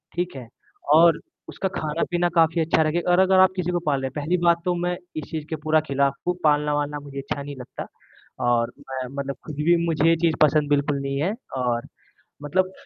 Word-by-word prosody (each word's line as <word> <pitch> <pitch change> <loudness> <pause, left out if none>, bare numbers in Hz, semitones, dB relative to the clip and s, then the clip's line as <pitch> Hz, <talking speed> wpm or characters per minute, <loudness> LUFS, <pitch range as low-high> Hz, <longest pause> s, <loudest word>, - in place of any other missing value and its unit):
ठीक 175 -1 -2
है? 125 -3 -8 0.5
और 165 +1 +6 0.3
उसका 190 - -3
खाना-पीना 170 +3 -1
काफ़ी 165 0 +3
अच्छा 160 0 +2
रखें 155 +3 0
और 175 - +4
अगर 190 0 +5
आप 190 - +6
किसी 180 -1 -1
को 175 - 0
पाल 140 -3 +1
रहे, 135 - -2
पहली 155 +4 0
बात 170 -1 +4
तो 180 - +2
मैं 175 +1 -1 0.2
इस 155 - -4
चीज़ 155 -2 -4
के 160 - -2
पूरा 155 0 +3
खिलाफ़ 140 0 +1
हूँ, 180 - +1
पालना-वालना 145 -1 +1
मुझे 140 -1 -11
अच्छा 140 +1 -4
नहीं 140 0 -7
लगता। 125 -2 -8 0.6
और 120 0 +2
मैं 130 -1 -6
मतलब 140 -1 -3
ख़ुद 155 - -6
भी 170 +1 +5
मुझे 165 -1 +2
ये 165 - +5
चीज़ 165 -1 +1
पसंद 150 -1 +4
बिल्कुल 145 0 +1
नहीं 140 0 -2
है 185 +7 0 0.2
और 120 -2 -1 0.6
मतलब 185 +6 0
155 Hz, 205 wpm, -24 LUFS, 140-170 Hz, 0.6 s, और